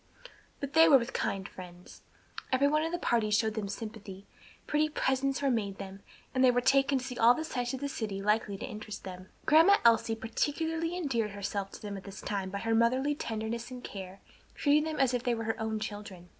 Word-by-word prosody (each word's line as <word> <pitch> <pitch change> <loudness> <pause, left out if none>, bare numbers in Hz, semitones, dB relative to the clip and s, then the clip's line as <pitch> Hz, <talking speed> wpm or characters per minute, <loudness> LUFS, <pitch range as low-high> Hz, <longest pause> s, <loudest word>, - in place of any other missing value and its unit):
But 280 0 -5
they 320 +1 +7
were 275 - +9
with 240 +1 -4
kind 195 0 -2
friends. 180 -1 -12 0.5
Every 265 +2 +4
one 305 +1 +2
in 325 +1 -1
the 350 - -1
party 230 -9 +1
showed 215 +1 +2
them 210 -2 -3
sympathy, 205 -2 -7 0.4
pretty 305 +1 +1
presents 270 -1 0
were 275 - +3
made 200 -5 -1
them, 195 0 -8 0.3
and 260 0 +2
they 255 - +7
were 245 0 +3
taken 270 +2 +3
to 255 - -4
see 250 -2 -6
all 235 +2 +7
the 320 - -3
sights 245 -5 -2
of 260 - -8
the 285 - -1
city 215 -7 -4
likely 210 0 0
to - - -5
interest 215 -3 -7
them. 185 0 -9 0.2
Grandma 330 +6 +7
Elsie 225 -1 +4
particularly 320 +9 -2
endeared 235 - -1
herself 200 0 -3
to - - -10
them 205 -1 -5
at 195 - -9
this 195 0 -9
time 195 -2 -3
by 200 - -4
her 225 +3 -1
motherly 255 +5 +3
tenderness 230 -2 -4
and 250 -1 -9
care, 190 -1 -8 0.3
treating 300 +1 +3
them 315 -2 -3
as 265 -2 +3
if 245 - 0
they 245 -1 0
were 225 - -4
her 225 0 -2
own 220 -1 -1
children. 205 -4 -7
230 Hz, 220 wpm, -30 LUFS, 205-275 Hz, 0.5 s, were